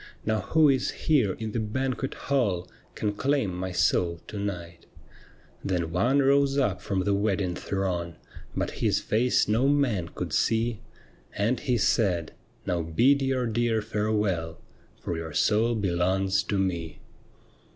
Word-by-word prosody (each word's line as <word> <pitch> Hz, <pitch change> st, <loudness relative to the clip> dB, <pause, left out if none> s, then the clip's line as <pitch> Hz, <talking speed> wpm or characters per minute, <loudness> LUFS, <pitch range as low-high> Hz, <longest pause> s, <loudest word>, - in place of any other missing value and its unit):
Now 110 Hz, 0 st, +1 dB
who 155 Hz, +10 st, +3 dB
is 130 Hz, -2 st, +2 dB, 0.2 s
here 130 Hz, -, +3 dB
in 110 Hz, +2 st, -5 dB
the 115 Hz, -, -2 dB
banquet 130 Hz, +4 st, -2 dB
hall 100 Hz, -11 st, 0 dB, 0.3 s
Can 105 Hz, -1 st, -1 dB
claim 130 Hz, -3 st, 0 dB
my 95 Hz, +1 st, -4 dB
soul 85 Hz, -1 st, +1 dB
to 105 Hz, -, -5 dB
night? 85 Hz, -4 st, -5 dB, 0.4 s
' -, -, -26 dB, 0.3 s
Then 90 Hz, -4 st, -1 dB
one 125 Hz, +11 st, +2 dB
rose 140 Hz, 0 st, +3 dB
up 105 Hz, -9 st, +1 dB
from 95 Hz, -2 st, -1 dB
the 100 Hz, -, +1 dB
wedding 100 Hz, -2 st, 0 dB
throng, 90 Hz, -3 st, -3 dB, 0.4 s
But -, -, -1 dB
his -, -, 0 dB
lace 120 Hz, +4 st, +3 dB
no 115 Hz, +6 st, +2 dB
man 125 Hz, -12 st, +1 dB
could -, -, -4 dB
see, 115 Hz, 0 st, +1 dB, 0.6 s
And 115 Hz, +5 st, +1 dB
he 125 Hz, -2 st, 0 dB
said: 90 Hz, -7 st, +1 dB, 0.2 s
' -, -, -34 dB
Now 90 Hz, -1 st, 0 dB
bid 120 Hz, -, +3 dB
your 135 Hz, -2 st, 0 dB
dear 115 Hz, 0 st, +1 dB
farewell. 105 Hz, -7 st, -1 dB, 0.4 s
For 85 Hz, -, -4 dB
your 80 Hz, -1 st, -6 dB
soul 110 Hz, +6 st, +2 dB
belongs 95 Hz, 0 st, +1 dB
to 100 Hz, -, -1 dB
me.' 85 Hz, -4 st, -2 dB
105 Hz, 150 wpm, -27 LUFS, 90-120 Hz, 0.6 s, who